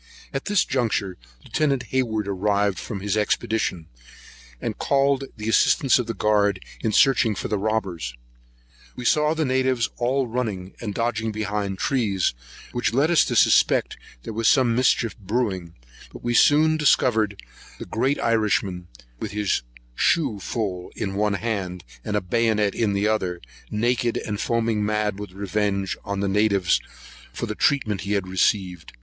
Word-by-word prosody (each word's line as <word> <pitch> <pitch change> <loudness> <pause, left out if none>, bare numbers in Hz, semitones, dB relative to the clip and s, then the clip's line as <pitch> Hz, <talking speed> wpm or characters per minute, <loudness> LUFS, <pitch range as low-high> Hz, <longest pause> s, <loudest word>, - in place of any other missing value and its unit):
At 135 - -3
this 205 -1 +2
juncture 110 -7 -1 0.4
Lieut. 140 -5 +2
Hayward 110 -5 0
arrived 100 0 0
from 100 -5 -6
his 100 0 -1
expedition, 105 -4 0 0.7
and - - -4
called 140 -1 +2
the 105 0 -5
assistance 125 +3 +4
of 120 - -2
the 115 - -3
guard 100 -2 +2 0.2
in 110 - -1
searching 120 -3 +4
for - - -4
the 105 -1 0
robbers. 95 - -2 0.8
We 125 - -7
saw 150 +4 +3
the 160 -1 0
natives 130 -2 +1
all 130 +2 +1
running, 110 -6 -3
and 105 -4 -4
dodging 115 -1 -1
behind 105 -2 -2
the - - -9
trees, 105 - +1 0.4
which 120 -1 -1
led 150 +5 +3
us 170 - +5
to - - -2
suspect - - +4 0.3
there - - -6
was 115 0 0
some 125 -4 +4
mischief 120 -2 +2
brewing; 95 -5 -2 0.4
but - - -12
we 120 0 0
soon 155 +5 +5
discovered 110 -8 +2 0.4
the - - -7
great 130 +6 0
Irishman, 105 -6 0 0.3
with 105 - -5
his 105 -9 0 0.3
shoe 130 - +1
full 95 -3 -3
in 95 - -3
one 105 0 +1
hand, 95 -5 -3 0.2
and 105 - -3
a 105 - +1
bayonet 105 +1 +1
in 110 -3 0
the 100 +1 +1
other, 95 -5 -1 0.3
naked 120 +2 0
and 105 -1 -3
foaming 115 -2 0
mad 105 -1 -1
with 105 -3 -7
revenge 100 0 -1
on 100 -1 -3
the 100 - 0
natives, 100 -2 +2 0.5
for - - -4
the - - -4
treatment 110 -9 +1
he 100 - -2
had 100 -2 -1
received. 95 - 0
105 Hz, 160 wpm, -23 LUFS, 100-120 Hz, 0.8 s, us